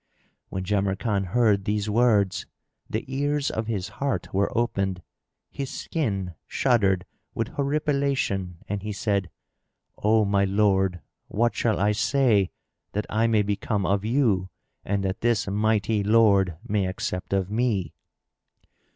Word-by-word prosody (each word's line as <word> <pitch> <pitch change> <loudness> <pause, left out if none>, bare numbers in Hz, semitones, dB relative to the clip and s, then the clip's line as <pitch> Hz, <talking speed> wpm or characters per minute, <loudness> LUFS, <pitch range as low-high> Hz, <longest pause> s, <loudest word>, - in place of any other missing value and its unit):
When 95 - -3
Jamrkan 100 +1 0
heard 105 0 +2
these 105 0 0
words, 105 -4 +2 0.4
the - - -2
ears 145 +2 0
of 110 0 -3
his 100 -5 -2
heart 140 -2 -1
were 100 +1 +2
opened; 95 -6 -1 0.5
his 135 -1 -4
skin 100 - -2
shuddered 100 -8 +2 0.3
with 115 0 -1
horripilation 140 - 0
and 100 0 -3
he 105 +1 -4
said, 100 -2 -1 0.7
"O 110 0 +3
my 100 0 +2
lord, 95 -3 +2 0.3
what 120 +3 +1
shall 110 -3 0
I 100 +2 +3
say 105 -3 +2 0.4
that 105 +1 -1
I 110 +2 +2
may 110 -2 +3
become 100 0 -1
of 100 +1 +1
you 110 -6 +1 0.3
and 100 0 -1
that 95 +2 -2
this 115 -4 +2
mighty 105 +1 +1
Lord 100 -5 +4
may 105 -4 +1
accept 90 -1 -4
of 95 0 0
me?" 110 -6 0
105 Hz, 135 wpm, -25 LUFS, 95-115 Hz, 0.7 s, Lord